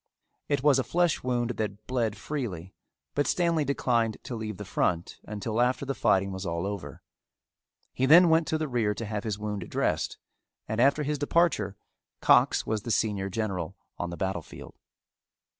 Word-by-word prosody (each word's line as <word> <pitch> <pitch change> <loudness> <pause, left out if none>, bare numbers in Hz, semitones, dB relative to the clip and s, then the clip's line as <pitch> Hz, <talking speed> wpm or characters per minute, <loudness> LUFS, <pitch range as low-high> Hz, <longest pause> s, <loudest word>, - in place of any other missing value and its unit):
It 140 -2 +1
was 145 -2 +5
a - - +1
flesh 175 +1 +1
wound 120 -1 0
that 105 -1 -4
bled 115 -5 -1
freely, 100 - -5 0.4
but 145 - +1
Stanley 170 -3 +2
declined 120 -5 +1
to 125 - -6
leave 110 -3 -5
the - - -7
front 85 -1 -1
until 110 +2 -2
after 125 +3 +1
the 135 - -1
fighting 95 -6 +2
was 95 0 -5
all 85 -1 -2
over. 95 -9 -6 0.9
He 130 - +1
then 170 +5 +8
went 160 0 +3
to 160 - +1
the 155 -1 -2
rear 115 -5 0
to 115 - -4
have 105 -1 -3
his 105 -3 -2
wound 105 -3 -4
dressed - - -1 0.5
and 110 +2 0
after 140 +3 +4
his 145 0 -2
departure 145 - +1 0.4
Cox - - +4
was 110 -1 -1
the 115 - -7
senior 105 -3 0
general 95 -3 -3 0.2
on 90 - -2
the 85 - -6
battle 95 -3 -1
field. - - -12
110 Hz, 175 wpm, -28 LUFS, 100-140 Hz, 0.9 s, then